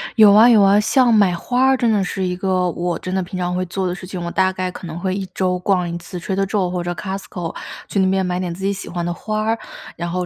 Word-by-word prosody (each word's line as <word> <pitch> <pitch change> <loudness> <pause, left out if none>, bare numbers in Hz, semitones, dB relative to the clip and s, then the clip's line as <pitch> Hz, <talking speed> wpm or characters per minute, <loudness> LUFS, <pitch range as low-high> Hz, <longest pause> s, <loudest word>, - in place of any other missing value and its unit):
有 215 -3 +7
啊， 220 +4 +7
有 225 -4 +6
啊。 195 +1 +5
像 240 +3 +3
买 200 -4 +4
花 245 +9 0
儿， 265 0 +4
真 240 -3 +2
的 205 -2 +2
是 190 +1 -3
一 180 0 -2
个 185 -1 0
我 175 0 -2
真 185 - -5
的 190 - +1
平 185 +1 -6
常 180 0 -2
会 185 0 -1
做 190 +2 -3
的 175 - -2
事 185 0 -9
情， 180 -2 -5
我 170 - -4
大 190 +1 +2
概 185 -1 -3
可 180 - -9
能 165 +1 -6
会 185 +1 -1
1 195 -1 -3
周 180 -1 0
逛 180 -1 0
1 170 - -4
次 175 +1 -8
Trader 195 +2 -1
Joe 195 -2 0
或 180 -1 -2
者 175 - -3
Costco， 190 -3 -6 0.3
去 200 - -1
那 190 -1 +3
边 190 0 +1
买 180 0 -2
点 180 -2 -3
自 190 +3 -9
己 200 - +1
喜 200 - -7
欢 175 -1 -3
的 175 - -1
花 215 +4 -3
儿， 225 +1 0 0.4
然 170 0 -4
后 180 +1 -2
185 Hz, 370 characters per minute, -20 LUFS, 180-200 Hz, 0.4 s, 有